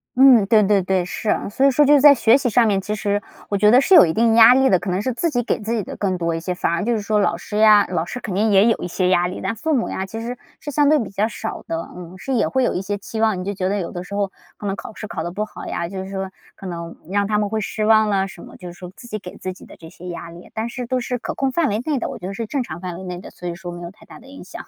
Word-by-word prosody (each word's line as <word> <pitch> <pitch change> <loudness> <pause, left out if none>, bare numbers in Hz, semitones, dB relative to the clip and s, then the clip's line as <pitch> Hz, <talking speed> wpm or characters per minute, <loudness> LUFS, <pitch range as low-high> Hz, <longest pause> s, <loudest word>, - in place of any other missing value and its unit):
嗯， 250 -5 +6
对 215 0 +5
对 200 0 +3
对， 185 -1 0
是， 210 +4 -2 0.2
所 260 - -1
以 - - +7
说 290 +3 +4
就 290 +1 +6
在 285 +1 +8
学 235 0 +5
习 275 -3 -1
上 235 +1 +4
面， 200 -3 +1
其 210 +2 -3
实 205 -1 -1 0.3
我 200 - 0
觉 210 +1 +4
得 245 +4 +7
是 380 - +2
有 - - +10
一 160 - -1
定 225 +2 +3
压 230 +2 +8
力 265 0 +4
的， 185 -7 +3
可 195 - -5
能 180 +1 0
是 255 +5 -2
自 335 +8 -1
己 245 -5 -1
给 - - -1
自 220 +2 -3
己 220 -3 -1
的 - - -8
更 190 -3 -1
多 170 -1 -1
一 165 - -2
些， 180 +2 -4
反 175 - -1
而 170 - -1
就 235 +3 0
是 220 - -1
说 210 +1 0
老 185 -4 +1
师 210 +4 -6
呀， 215 -2 +6
老 175 -3 -1
师 210 +8 -6
肯 215 -6 -5
定 210 +4 +1
也 200 0 +5
有 230 - +3
一 - - -4
些 180 +1 0
压 175 -1 +3
力， 180 - -6
但 225 - -2
父 315 +6 -1
母 240 - -1
呀 190 - -4
其 225 +3 -7
实 235 +2 -5 0.2
是 295 - -6
相 290 0 +3
对 305 - +5
比 225 - -4
较 205 +2 0
少 225 - -6
的， 165 - -2 0.2
嗯。 180 0 -10
是 270 - -4
也 240 - +2
会 260 0 0
有 - - +1
一 180 - -2
些 205 +1 -3
期 220 +2 -6
望， 220 -4 +2
你 - - -4
就 200 - -2
觉 185 -1 -2
得 205 - 0
有 175 - -4
的 175 - -6
时 200 +2 -8
候 200 -1 -1 0.3
可 - - -9
能 195 -1 -1
考 - - -9
试 - - -7
考 160 - -5
得 170 +2 -4
不 210 +4 -3
好 - - -10
呀， 170 - -3
就 190 +1 -6
是 190 - -9
说 190 -1 -4 0.2
可 - - -12
能 170 -2 -6 0.2
让 200 0 +1
他 210 0 +1
们 210 0 0
会 215 +1 -2
失 215 +1 -3
望 215 0 +4
了 195 -1 +1
什 175 - -12
么， - - -13
就 180 - -10
是 - - -10
说 180 0 -10
自 240 +2 -13
己 215 -2 -5
给 180 -2 -10
自 185 - -5
己 - - -15
的 - - -14
这 165 - -12
些 180 +2 -12
压 170 -1 -7
力， 170 +1 -13
但 220 +1 -2
是 245 0 -6
都 255 +1 0
是 250 0 -3
可 - - -5
控 270 -1 0
范 315 0 +1
围 210 - -1
内 295 -4 0
的， - - -3
我 - - -6
觉 180 - -9
得 195 - -4
是 225 +2 -5
正 275 +2 -2
常 165 -6 -8
范 180 -2 -5
围 190 - -9
内 180 -1 -6
的， - - -11
所 180 - -9
以 175 - -3
说 175 0 -8
没 175 0 -8
有 170 - -7
太 205 - -21
大 - - -13
的 - - -18
影 275 +1 -12
响。 - - -10
205 Hz, 370 characters per minute, -21 LUFS, 185-235 Hz, 0.3 s, 有